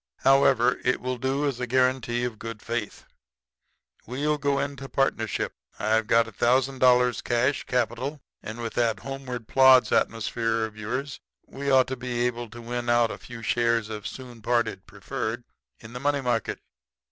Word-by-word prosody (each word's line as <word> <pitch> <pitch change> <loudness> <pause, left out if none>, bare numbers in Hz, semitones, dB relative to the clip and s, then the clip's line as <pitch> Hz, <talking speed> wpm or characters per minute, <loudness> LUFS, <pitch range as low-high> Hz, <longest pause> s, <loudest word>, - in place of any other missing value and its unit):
However, 130 -2 +4
it 125 - +1
will 125 0 -3
do 135 +3 0
as 135 -4 -1
a 125 - -2
guarantee 125 -1 +1
of 120 -3 -3
good 115 -2 -6
faith. 115 -2 -4 1.0
We'll 145 +5 -1
go 140 0 +1
into 140 -1 -4
partnership. 115 -6 0 0.2
I've 110 0 +1
got 115 0 +4
a - - -9
thousand 130 +4 +1
dollars 125 -1 +4
cash 125 +3 0
capital; 125 +4 -1 0.2
and 110 +2 -7
with 115 - -4
that 115 -4 0
homeward 130 -4 -6
plods 130 -1 +6
atmosphere 115 0 0
of 110 -1 -9
yours 130 +6 -4 0.3
we 140 +1 -5
ought 130 -1 +5
to 130 - -4
be 120 -1 -2
able 120 -1 -3
to 120 +2 -10
win 120 0 -3
out 120 -1 +3
a - - -7
few 115 -2 -10
shares 115 -2 +1
of 105 -2 -5
Soon 125 -3 -9
Parted, 115 -4 0
preferred, 110 +3 -4 0.4
in 115 +1 -12
the 125 - -5
money 145 +1 +1
market.' 120 -3 -1
120 Hz, 170 wpm, -26 LUFS, 115-130 Hz, 1.0 s, plods